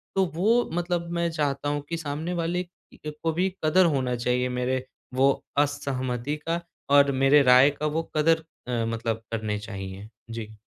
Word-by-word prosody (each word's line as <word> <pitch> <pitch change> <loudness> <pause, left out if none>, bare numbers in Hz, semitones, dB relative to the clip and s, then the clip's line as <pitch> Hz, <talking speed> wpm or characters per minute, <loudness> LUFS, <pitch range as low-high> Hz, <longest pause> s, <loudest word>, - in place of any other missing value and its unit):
तो 190 0 +3
वो 225 +8 +3
मतलब 175 0 -1
मैं 170 0 0
चाहता 145 -3 -1
हूँ 145 0 -1
कि 170 - -2
सामने 155 +2 -4
वाले 175 +1 -1
की 175 -3 -11
को 165 - +2
भी 180 +4 +1 0.2
कदर 185 +4 +5
होना 130 -6 +1
चाहिए 125 +1 0
मेरे 125 +1 -1 0.3
वो 135 +2 +4 0.3
असहमति 140 -2 -1
का 165 +1 +1 0.4
और 140 0 +6
मेरे 135 +2 +5
राय 125 +2 +7
का 145 +1 -5
वो 155 +2 0
कदर 160 +1 +3 0.2
अ, 120 -2 0
मतलब 115 0 -2
करने 110 -2 -2
चाहिए। 100 -1 -7 0.2
जी। 110 -2 -7
145 Hz, 170 wpm, -26 LUFS, 125-165 Hz, 0.4 s, राय